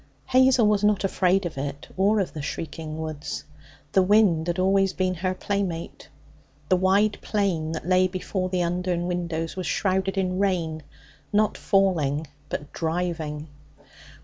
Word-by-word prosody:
Hazel 260 -2 +5
was 210 -1 +2
not 210 -2 +3
afraid 190 0 +2
of 160 -5 -4
it, 140 +1 -5
or 205 +3 +3
of 190 - -2
the 155 - -5
shrieking 155 +1 -5
woods. 155 -1 -5 0.5
The 190 - +4
wind 185 -4 +4
had 175 +1 -1
always 195 +1 +3
been 185 -1 0
her 185 +1 -2
playmate. 185 -4 -3 0.6
The 185 - +5
wide 195 +3 +2
plain 175 -7 -1
that 160 0 -5
lay 185 0 +4
before 185 0 -3
the 180 -1 0
Undern 175 0 -1
windows 170 -2 -2
was 185 -1 -4
shrouded 190 0 0
in 185 -1 0
rain 170 -5 0 0.5
not 210 0 +2
falling, 160 -7 +1 0.2
but 145 - -5
driving. 160 -3 -2
185 Hz, 145 wpm, -25 LUFS, 165-195 Hz, 0.6 s, Hazel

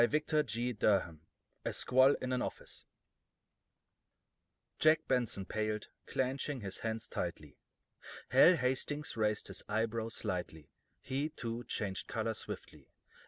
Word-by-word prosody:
CHAPTER 150 +4 +2
IV 120 -3 -1 0.8
A - - -2
SQUALL 130 +2 +5
IN 130 0 -1
AN 125 - +1
OFFICE - - -6 1.9
Jack 155 0 +4
Benson 120 -6 +1
paled, 110 0 -2 0.2
clenching 135 +1 -1
his 100 -2 -5
hands 110 0 -3
tightly. 75 -5 -5 0.7
Hal 135 +9 +8
Hastings 140 +3 -1
raised 105 -1 0
his - - -3
eyebrows 115 +1 -1
slightly; 90 - -4 0.3
he, 135 +3 -1
too, 120 -5 -5
changed 95 -4 -2
color - - -1
swiftly. - - -7
120 Hz, 115 wpm, -34 LUFS, 105-135 Hz, 1.9 s, Hal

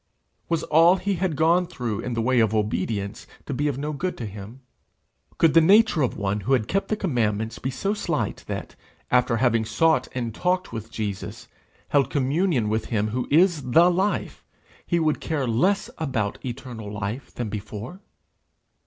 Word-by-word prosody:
Was 165 -2 0
all 165 +4 +5
he 200 +1 -1
had 175 -3 -1
gone 170 +4 +3
through 115 -8 -4
in 120 +1 -3
the 115 - 0
way 125 +1 +3
of 110 -1 +2
obedience 105 -1 -2 0.2
to 140 - -4
be 145 +3 0
of 140 -3 -1
no 150 +2 -3
good 180 +6 -3
to 120 - -5
him? 105 +5 -9 0.8
Could 165 -2 +4
the 165 - +7
nature 200 0 +5
of 130 - 0
one 100 0 -1
who 105 +7 0
had 115 -5 +2
kept 195 +1 0
the 215 - 0
commandments 115 - -1
be 130 - -3
so 195 +10 -1
slight 215 - -2
that, - - -5 0.4
after 125 -2 +3
having 115 -2 +2
sought 130 +5 +2
and 120 -3 -3
talked 180 - -1
with 115 0 -6
Jesus, 105 -4 -5 0.4
held 140 -3 +3
communion 140 - +1
with 110 +1 -1
him 110 -2 -1
who 125 +3 -2
is 170 0 +4
the 170 +4 +7
Life, 190 +4 -1 0.4
he 170 - +1
would 155 -2 +1
care 155 -5 -1
less 140 - +1
about 125 -10 -2
eternal 120 -4 -6
life 105 +5 -5
than 120 -3 -3
before? 105 - -7
130 Hz, 180 wpm, -24 LUFS, 110-165 Hz, 0.8 s, the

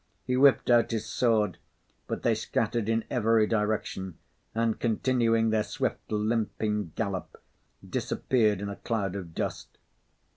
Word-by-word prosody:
He 125 - 0
whipped 135 -1 +5
out 120 -1 +5
his 110 -2 -2
sword, 110 -6 +1 0.5
but - - -4
they - - +3
scattered 115 -2 -1
in 115 0 +1
every 115 -3 +3
direction 105 -5 -2 0.4
and 115 -1 0
continuing 115 -1 +2
their 110 -1 +2
swift, - - -3
limping 105 -3 -1
gallop, 100 -4 -3 0.5
disappeared 110 -6 +1
in 100 - -3
a 100 - -6
cloud 100 -5 -2
of 85 -5 -7
dust. - - -4
110 Hz, 135 wpm, -28 LUFS, 105-115 Hz, 0.5 s, whipped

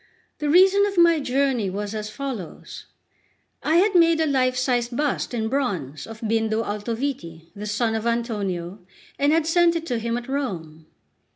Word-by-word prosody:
The 300 -1 -1
reason 385 +5 +5
of 400 -2 -5
my 340 -2 +5
journey 265 -6 0
was 205 +2 -4
as 215 -1 -4
follows. 235 - -7 0.8
I 315 - +1
had 395 +4 +4
made 335 -2 +5
a 320 - +3
life 255 -3 +1
sized 245 -2 0
bust 295 -2 -1
in 225 -3 -2
bronze 185 - -2
of 225 0 -10
Bindo 225 0 0
Altoviti, 205 - -4
the 205 +1 -6
son 220 +2 0
of 220 +1 -2
Antonio, 205 -6 -2 0.4
and 285 +1 +3
had 325 0 +2
sent 340 +1 +3
it 330 -1 -3
to 245 -6 -2
him 235 +1 -2
at 240 - -7
Rome. 165 - -4
240 Hz, 170 wpm, -23 LUFS, 210-290 Hz, 0.8 s, reason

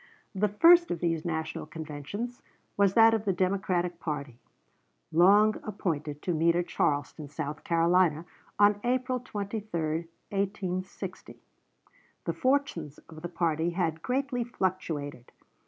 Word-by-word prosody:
The 205 +1 +2
first 340 - +6
of 170 - -2
these 165 -2 0
National 160 -2 -3
conventions 160 - -6 0.3
was 200 -1 +3
that 225 0 +7
of 220 -2 0
the 200 - +1
Democratic 180 -2 0
party, 140 -6 -5 0.7
long 200 +6 +5
appointed 155 -8 -3
to 180 - 0
meet 165 +1 +3
at 175 0 +1
Charleston, 145 +1 -1
South 150 +1 -5
Carolina, 170 -1 +3 0.3
on 205 0 +4
April 255 +1 0
23, 200 -8 -3 0.2
1860. 190 -2 -4 0.9
The - - -1
fortunes 255 - 0
of 155 -1 -11
the 175 - -5
party 165 -1 0
had 165 -3 0
greatly 255 +1 -1
fluctuated. 165 - -3
180 Hz, 125 wpm, -29 LUFS, 160-210 Hz, 0.9 s, that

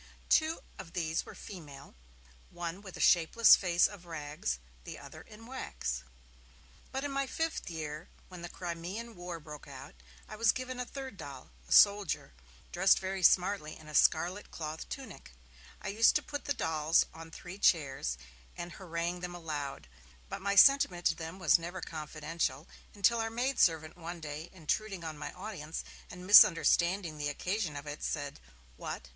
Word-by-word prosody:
Two 315 +1 +3 0.2
of 165 - -9
these 160 -2 -1
were - - -10
female, 145 -8 -10 0.6
one 175 +2 -5
with 190 -3 -10
a - - -10
shapeless 180 +7 +6
face 175 -2 +3
of 190 -4 -4
rags, 145 - -3 0.3
the - - -8
other - - -11
in 220 +2 -14
wax. 70 - -4 0.9
But, 265 +1 -3
in 285 - -2
my 275 0 -1
fifth 325 - -2
year, 155 -1 -6 0.2
when 180 -2 -10
the 175 - -6
Crimean 180 +8 -6
War 175 -1 -6
broke 150 -1 -10
out, 135 -1 -10 0.3
I 215 - -8
was 230 0 +5
given 255 0 -5
a 250 - -2
third 265 -6 -7
doll, 135 - -9 0.2
a - - -14
soldier, 200 - +5 0.4
dressed 190 +2 +5
very 190 0 -3
smartly 180 -3 +3
in 155 - -15
a 155 - -9
scarlet 175 +7 +3
cloth 155 0 -6
tunic. 230 - -8 0.5
I - - -3
used 220 +3 +4
to - - +2
put 290 -1 -6
the 285 - 0
dolls 160 -5 +2
on 165 0 -10
three 175 +4 -9
chairs, 135 - +2 0.4
and 175 0 -5
harangue 170 0 -3
them 175 0 -6
aloud, 145 - -5 0.4
but - - -5
my 200 +1 0
sentiment 195 -7 +6
to - - +4
them 165 +2 -7
was 180 -2 +4
never 175 +3 -6
confidential, 155 0 -3 0.3
until 230 +3 +3
our 225 0 0
maid 250 +4 -1
servant 160 -2 +3
one 170 0 -7
day, 155 +1 -6
intruding 190 +2 -2
on 160 -1 -5
my 150 - -6
audience, 180 -6 -6 0.3
and 180 +1 -9
misunderstanding 175 -3 +6
the 145 0 -1
occasion 180 +2 -2
of 145 0 -6
it, 150 0 -6
said: 145 -1 -3 0.4
'What? 65 - -6
175 Hz, 170 wpm, -32 LUFS, 155-200 Hz, 0.9 s, shapeless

